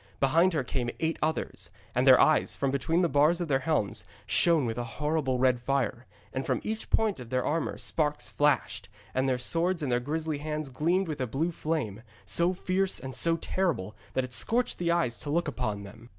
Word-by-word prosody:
Behind 165 +7 +4
her 145 -5 0
came 120 -1 -2
eight 160 0 -1
others. 160 +1 -2 0.2
And - - +1
their - - +9
eyes, - - +3
from 135 -1 0
between 165 +6 +1
the - - +4
bars 155 +3 +3
of 175 - -2
their 135 -3 +2
helms, 135 -7 0 0.2
shone 165 -5 +3
with 115 0 -2
a - - -1
horrible 150 -3 0
red 125 -1 +3
fire, 130 -1 -1 0.3
and 130 - -2
from - - 0
each 220 0 -4
point 220 -8 +1
of 120 -2 -9
their 130 0 0
armour 160 +2 -1
sparks 150 -2 -1
flashed, 130 -9 0 0.2
and 130 +1 +1
the 130 - +1
swords 170 +6 0
in 140 - -1
their 120 0 +2
grisly 155 +3 -2
hands 150 -1 -4
gleamed 170 +8 +1
with 150 -4 -4
a 130 - 0
blue 155 +9 -1
flame, 150 - -3 0.2
so 170 - +3
fierce 185 +1 -1
and 130 0 -7
so 165 +4 +2
terrible 160 - -1 0.2
that 130 - +2
it 125 -1 -7
scorched 240 - +1
the 170 -1 0
eyes 170 -9 +1
to 145 - -6
look 170 +3 +1
upon 110 -8 -3
them. 115 +4 -13
150 Hz, 210 wpm, -28 LUFS, 125-165 Hz, 0.3 s, their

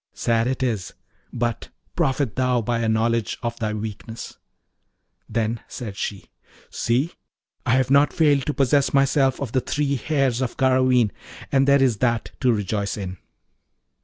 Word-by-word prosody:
Sad 120 +3 0
is 110 -8 -1
it! - - -21 0.4
but 120 -1 -2 0.3
profit 135 - 0
thou 125 -1 +2
by 115 +1 -1
a 115 -1 0
knowledge 115 0 +1
of 120 0 -3
thy 110 -1 -1
weakness.' 110 +1 -7 0.9
Then 115 +1 -1
said 110 -6 -7
she, 100 -1 -5 0.4
'See, 130 +8 0 0.6
I 115 - +4
have 130 0 +1
not 140 +1 +5
failed 145 -5 +2
to 150 - 0
possess 140 +1 +2
myself 135 -1 +3
of 140 -5 -4
the 130 - +1
three 140 +1 -1
hairs 135 -2 0
of 125 -2 -3
Garraveen, 130 -4 +3 0.4
and 135 0 +3
there 140 -1 +5
is 125 -5 +2
that 120 0 0
to 130 -2 +3
rejoice 105 -1 -1
in.' 95 -2 -5
125 Hz, 155 wpm, -23 LUFS, 115-135 Hz, 0.9 s, not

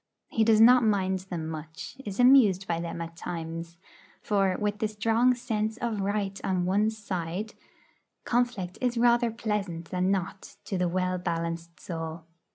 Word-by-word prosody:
He 225 - +2
does 220 -1 +5
not 245 +2 +7
mind 190 -3 +1
them 165 -3 -4
much, 160 +4 -7
is 205 -3 -6
amused 235 -7 +6
by 165 -1 -1
them 170 0 -4
at 165 0 -7
times; 165 0 -6 0.4
for, 195 -3 +1
with 210 0 -1
the 215 - +1
strong 225 +4 +2
sense 220 -2 -2
of 230 -4 -2
right 200 0 -2
on 185 -2 0
one's 210 +4 +1
side, 190 +1 -4 0.7
conflict 235 -7 -1
is 250 -1 0
rather 240 0 +4
pleasant 205 -7 -3
than 185 0 +1
not 195 0 -3
to 190 - -2
the 180 -1 +1
well 185 +1 0
balanced 170 -1 -4
soul. 165 -1 -6
195 Hz, 160 wpm, -28 LUFS, 170-220 Hz, 0.7 s, not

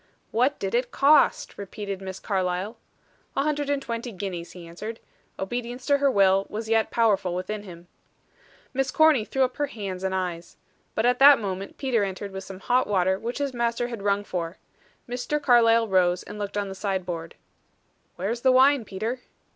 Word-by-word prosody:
"What 255 +6 +2
did 195 - -3
it 245 +1 +1
cost?" 285 -5 +3
repeated 200 -1 -6
Miss 190 -1 -6
Carlyle. 190 +2 -2 0.6
"A 275 - +3
hundred 295 -1 -1
and 285 -1 +1
twenty 235 -2 -5
guineas," 180 -3 -6
he 180 -2 -10
answered. 210 +7 -7 0.4
Obedience 245 +5 -4
to 285 -1 +3
her 280 0 +4
will 195 -4 +3
was 220 +1 -5
yet 225 0 +2
powerful 200 -6 +2
within 205 +4 -4
him. 175 -3 -12 0.9
Miss 270 0 0
Corny 310 -4 +4
threw 265 +5 0
up 255 -1 -1
her 290 - 0
hands 195 -7 -6
and 190 0 -1
eyes. 175 -2 -4 0.4
But 220 - +1
at 245 0 +3
that 280 0 +9
moment 195 -2 -5
Peter 250 -6 +1
entered 195 +1 -4
with 190 0 -6
some 190 0 -9
hot 250 +5 +2
water 190 -1 +1
which 235 +3 -4
his 285 -2 -2
master 235 0 -1
had 230 -4 -6
rung 200 0 +1
for. 175 -2 -4 0.5
Mr. 250 +5 -2
Carlyle 230 -4 +4
rose 180 -2 +2
and 210 - -9
looked 205 0 -4
on 205 -1 -1
the 195 - -6
side 190 -1 -2
board. 165 -2 -5 0.8
"Where 195 +4 -2
is 235 0 -4
the 260 - +5
wine, 265 0 +5
Peter?" 220 +6 -3
210 Hz, 185 wpm, -25 LUFS, 190-245 Hz, 0.9 s, that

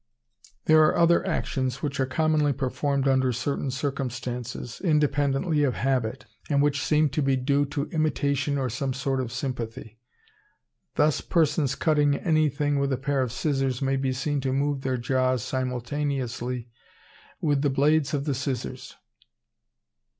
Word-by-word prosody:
There 155 0 +6
are 155 - +4
other 170 0 +4
actions 130 0 -2
which 140 -2 -2
are 130 - +1
commonly 155 +1 +2
performed 140 +1 -1
under 130 -1 +3
certain 130 +3 -2
circumstances, 125 -3 -4
independently 150 -1 +2
of 130 -4 +1
habit, 130 -4 -1 0.2
and 140 -2 +2
which 145 -1 +2
seem 150 -1 +2
to 140 +3 -1
be 135 -1 +2
due 140 +2 +1
to 140 +1 -2
imitation 145 -3 0
or 135 -2 0
some 130 +3 -2
sort 135 -1 -1
of 120 -2 -5
sympathy. 120 -3 -5 1.0
Thus 150 -1 +2
persons 150 -5 +1
cutting 150 -3 +2
anything 150 -2 +1
with 140 0 0
a 130 - +1
pair 135 +1 0
of 125 -3 -1
scissors 135 -1 -1
may 135 -1 0
be 135 -1 0
seen 140 +2 -1
to 130 0 -1
move 140 +1 0
their 130 -1 -1
jaws 130 0 +1
simultaneously 125 -1 -3 0.7
with 145 -4 +1
the 145 - +2
blades 145 +2 +2
of 140 0 -2
the 145 - 0
scissors. 135 -1 -4
135 Hz, 150 wpm, -26 LUFS, 130-145 Hz, 1.0 s, There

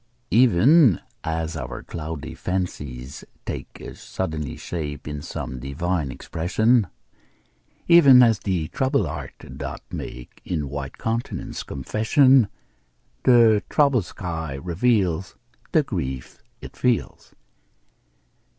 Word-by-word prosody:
Even 125 - +5 0.2
as 80 0 -2
our 60 -5 -6
cloudy 80 -2 -6
fancies 70 -8 -4 0.2
take - - -7
Suddenly 80 -6 -4
shape 75 -4 -5
in 75 -1 -5
some 65 -3 -6
divine 75 +3 -2
expression, 105 - +1 1.0
Even 140 -7 +8
as 115 -4 +4
the 90 -6 -1
troubled 130 -2 +1
heart 75 -4 -7
doth - - -5
make 60 0 -8
In 85 -4 -2
the 70 - -4
white 70 -1 -6
countenance 115 +1 -3
confession 115 - +3 0.8
The 115 -4 +6
troubled 140 - +3
sky 80 -7 -5
reveals 90 - 0 0.4
The 155 - +4
grief 65 - -5 0.2
it - - -10
feels. 125 -2 -1
85 Hz, 105 wpm, -23 LUFS, 75-115 Hz, 1.0 s, Even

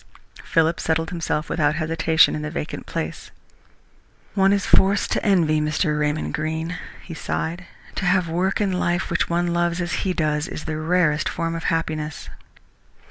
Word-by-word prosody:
Philip 165 +1 +2
settled 160 0 0
himself 165 -2 -2
without 150 -2 +1
hesitation 160 0 +3
in 150 - -3
the 150 - -3
vacant 150 - -5
place. - - -4 1.0
"One 195 -1 +4
is 200 0 +1
forced 195 +1 +3
to - - 0
envy 165 -7 +3
Mr. 150 0 0
Raymond 150 +1 -1
Greene," 160 +3 -2 0.3
he 170 - -8
sighed. 170 +2 -3 0.3
"To - - -1
have 180 -1 +3
work 180 +4 0
in 205 -2 +1
life 175 -1 0
which 170 - +1
one 170 0 +1
loves 175 0 +1
as 175 -2 -2
he 190 - 0
does 150 -2 0
his 175 - -6
is - - -11
the 155 -1 -3
rarest 155 -2 +2
form 165 -1 -2
of 165 0 -5
happiness." 155 -2 -2
165 Hz, 170 wpm, -23 LUFS, 155-175 Hz, 1.0 s, One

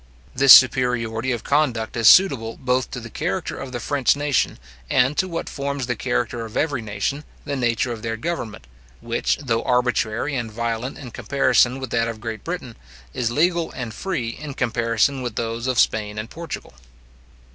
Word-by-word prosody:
This 135 +1 +6
superiority 125 -2 +5
of 120 -2 -3
conduct 130 -7 0
is 115 -2 +6
suitable 130 -12 +4
both 130 0 0
to 125 - -6
the 115 -1 -10
character 175 - -3
of 135 - -7
the 120 - -4
French 140 +2 +2
nation, 145 -1 0 0.3
and 135 +3 +3
to 185 - +1
what 165 -2 -4
forms 140 -2 -3
the 125 0 -2
character 120 -1 -2
of 110 -1 -6
every 145 -5 0
nation, 110 +7 -3 0.2
the 145 -1 -2
nature 120 -1 0
of 115 -2 -6
their 115 0 -3
government, 115 - -4 0.3
which, 115 +7 -1
though 115 -4 0
arbitrary 125 +1 0
and 120 -3 -3
violent 115 +3 -3
in 125 -4 -9
comparison 125 +1 +2
with 130 -3 -6
that 115 -1 +1
of 115 -1 -5
Great 110 -2 -6
Britain, 165 -9 -5 0.4
is 120 -2 -1
legal 170 +6 +1
and 120 -4 -5
free 155 - -3
in 140 +3 -7
comparison 115 +2 +1
with 120 -3 -4
those 115 +2 -3
of 130 -2 +1
Spain 105 -1 +1
and 110 +2 -5
Portugal. 165 - -7
125 Hz, 180 wpm, -22 LUFS, 115-140 Hz, 0.4 s, This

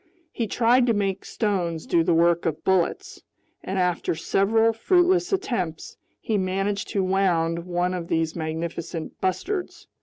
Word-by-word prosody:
He 230 - -2
tried 245 +3 +3
to 230 - +3
make 195 -1 -1
stones 180 -7 -2
do 170 -1 +2
the - - +1
work 170 0 +3
of 160 -1 -3
bullets, 190 - 0 0.4
and 190 +1 -3
after 180 -3 0
several 220 +7 +2
fruitless 360 - +2
attempts, 185 - -2 0.2
he 215 -2 -1
managed 195 +2 -1
to 195 - -1
wound 175 -3 +1
one 180 +1 0
of 175 -2 -4
these 165 -1 0
magnificent 160 0 -5
bustards. 355 - -2
185 Hz, 145 wpm, -24 LUFS, 170-225 Hz, 0.4 s, tried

